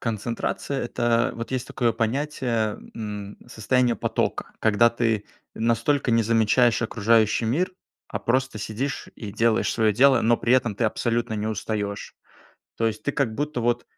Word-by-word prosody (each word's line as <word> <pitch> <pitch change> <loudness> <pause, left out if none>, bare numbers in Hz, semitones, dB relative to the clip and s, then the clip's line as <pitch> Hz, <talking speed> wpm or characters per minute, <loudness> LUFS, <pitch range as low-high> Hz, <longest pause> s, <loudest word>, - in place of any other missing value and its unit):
Концентрация- 115 +4 -3
это 120 0 +1
вот 115 0 -6
есть 130 -2 -2
такое 120 -2 0
понятие, 115 -2 -1 0.2
м, 105 -2 -6
состояние 120 +1 +1
потока. - - -2
Когда 110 +2 +4
ты 115 -3 0 0.3
настолько 115 +4 +1
не 115 0 +4
замечаешь 115 +2 +3
окружающий 110 0 +2
мир, 165 - 0 0.4
а - - -3
просто 130 -1 0
сидишь 110 +6 -4
и 105 -3 -7
делаешь 115 +1 +2
свое 110 -2 +2
дело, 130 +2 +5
но 115 +1 +3
при 120 - 0
этом 120 -4 +2
ты 115 +3 -1
абсолютно 115 +1 0
не 105 0 -2
устаешь. 105 -1 -3 0.6
То 115 - +1
есть 110 -1 -2
ты - - 0
как 120 -6 0
будто 145 -1 -2
вот 120 +1 0
115 Hz, 155 wpm, -24 LUFS, 110-125 Hz, 0.6 s, дело